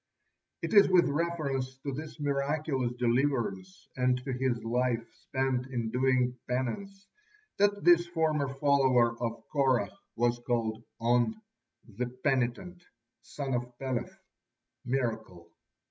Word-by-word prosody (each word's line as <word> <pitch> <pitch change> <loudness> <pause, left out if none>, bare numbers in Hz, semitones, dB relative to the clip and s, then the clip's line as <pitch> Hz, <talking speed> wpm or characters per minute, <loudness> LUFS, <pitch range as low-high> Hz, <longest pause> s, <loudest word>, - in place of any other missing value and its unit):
It - - -2
is 205 -2 +7
with 180 -2 +5
reference 140 -5 -2
to 140 - -2
this 155 +3 -7
miraculous 140 -2 0
deliverance 120 -6 -1
and 125 -1 +2
to 135 - -2
his 125 -3 -1
life 120 0 0
spent 130 -1 -2
in 120 -4 -3
doing 125 -1 +1
penance 195 - -3 0.5
that 205 0 +2
this 175 0 +6
former 160 -4 +1
follower 135 -4 +3
of 115 -1 -4
Korah 135 -4 +2 0.2
was 120 +1 +1
called 115 -2 -1 0.2
On, 120 - +2 0.5
"the 115 +3 -3
penitent," 130 +7 -1 0.4
son 140 -2 -5
of 120 0 -3
Peleth, 130 -3 -3 0.7
"miracle." 110 -9 -3
130 Hz, 115 wpm, -30 LUFS, 120-145 Hz, 0.7 s, is